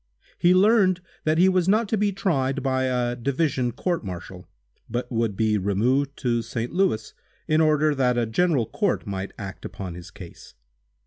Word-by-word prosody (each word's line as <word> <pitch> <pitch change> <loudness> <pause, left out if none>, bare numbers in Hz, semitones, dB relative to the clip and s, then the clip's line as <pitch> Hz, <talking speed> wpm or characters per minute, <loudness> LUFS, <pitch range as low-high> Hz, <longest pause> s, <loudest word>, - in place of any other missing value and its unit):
He 175 +1 +5
learned 190 -2 +4 0.3
that 155 +1 +2
he 180 +3 +5
was 185 -1 +2
not 215 +2 +3
to - - +1
be 205 -1 +1
tried 140 -9 -1
by 130 -1 +1
a 125 -1 0
division 130 0 0
court 170 +6 -2
martial, 90 -1 -8 0.4
but 120 +1 -3
would 115 -4 -1
be 110 -2 +2
removed 125 +9 0
to 120 -3 +1
St. 115 +1 -4
Louis, 175 - 0 0.3
in 155 0 +3
order 155 -1 +3
that 125 -3 +1
a 120 - +2
general 140 +2 +1
court 200 - -1
might 95 -2 -4
act 100 -3 -8
upon 95 -3 -6
his 85 +1 -10
case. 85 0 -13
130 Hz, 175 wpm, -24 LUFS, 110-170 Hz, 0.4 s, He